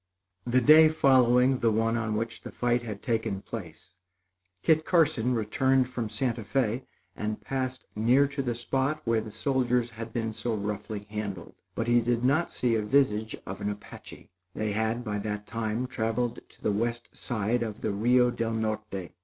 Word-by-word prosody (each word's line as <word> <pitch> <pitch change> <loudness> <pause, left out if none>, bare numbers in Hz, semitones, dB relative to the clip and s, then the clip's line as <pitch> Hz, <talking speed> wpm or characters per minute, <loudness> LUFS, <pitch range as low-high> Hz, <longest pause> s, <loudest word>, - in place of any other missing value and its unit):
The 125 +1 +3
day 155 +4 +8
following 130 -3 +4
the 115 - +3
one 115 +1 +1
on 110 -2 -1
which 115 +2 -3
the - - -8
fight 120 0 +1
had 105 -4 -7
taken 110 -5 -1
place, 85 -4 -9 0.7
Kit 160 -1 +4
Carson 135 -9 +2
returned 130 +4 +2
from 120 -3 -3
Santa 115 +2 -1
Fé 125 +2 -1 0.3
and 105 0 -3
passed 130 +3 -3
near 125 +6 +4
to 140 0 -3
the 120 -3 -2
spot 135 +5 -1
where 115 -1 +2
the 110 - -8
soldiers 125 +1 0
had 115 0 -7
been 115 -1 -2
so 115 +1 -2
roughly 105 0 -4
handled; 100 -5 -5 0.2
but 115 - -1
he 120 0 +4
did 120 +1 0
not 150 +6 +2
see 125 -2 0
a 110 - +2
visage 110 -2 +1
of 95 - -7
an 105 - -1
Apache. 105 0 -10 0.2
They 110 -1 -1
had, 110 +3 -1
by 105 -3 -2
that 105 0 -4
time, 115 +2 -2
traveled 120 -1 -2
to - - -21
the - - +2
west 115 +3 -2
side 115 +1 -1
of 110 -3 -4
the 110 - -1
Rio 120 +4 +3
del 115 -1 -2
Norte. 110 -4 -3
115 Hz, 180 wpm, -28 LUFS, 110-125 Hz, 0.7 s, day